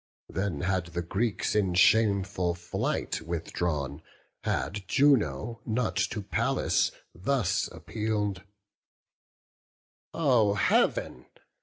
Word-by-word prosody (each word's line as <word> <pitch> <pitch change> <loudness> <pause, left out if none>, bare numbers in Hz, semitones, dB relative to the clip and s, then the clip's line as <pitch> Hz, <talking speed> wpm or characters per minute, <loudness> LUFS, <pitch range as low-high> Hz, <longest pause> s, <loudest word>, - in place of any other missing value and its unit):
Then 95 -7 -2
had 95 -2 0
the 85 0 -4
Greeks 100 +3 -1
in 95 -4 +1
shameful 100 -3 +3
flight 85 0 -2
withdrawn, 80 -4 -3 0.4
Had 90 +10 -2
Juno 115 - +2
not 115 +1 -1
to 105 - -1
Pallas - - +1 0.2
thus 105 +3 0
appeal'd: 105 -4 -3 1.7
"Oh 125 -10 +3
Heav'n! 60 -9 +1
95 Hz, 90 wpm, -28 LUFS, 85-110 Hz, 1.7 s, shameful